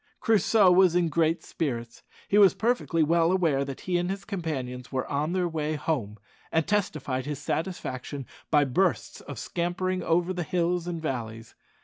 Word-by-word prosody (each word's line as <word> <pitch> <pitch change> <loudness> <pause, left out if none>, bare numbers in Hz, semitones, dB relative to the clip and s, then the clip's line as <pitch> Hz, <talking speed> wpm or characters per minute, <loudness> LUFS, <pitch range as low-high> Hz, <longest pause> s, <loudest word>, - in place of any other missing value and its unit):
Crusoe 215 -2 +4
was 180 -1 +5
in 175 -2 +2
great 160 +1 +1
spirits. 120 -7 -4 0.3
He 205 - +4
was 195 -2 +7
perfectly 220 -8 +1
well 165 +2 +3
aware 165 -7 +2
that 135 -1 -7
he 180 -1 0
and 175 +1 -1
his 195 +1 -4
companions 135 - -4
were 130 -2 -1
on 150 +4 -1
their 180 -1 +1
way 155 -2 -2
home, 125 -9 -2 0.3
and 160 -1 +1
testified 145 -10 -1
his 150 -1 -3
satisfaction 145 -4 -4 0.2
by 145 -2 +4
bursts 175 +8 0
of 145 - -8
scampering 180 +5 -2
over 175 +2 +1
the 180 - -3
hills 175 +1 0
and 170 -2 -3
valleys. 115 -7 -5
165 Hz, 165 wpm, -27 LUFS, 140-180 Hz, 0.3 s, was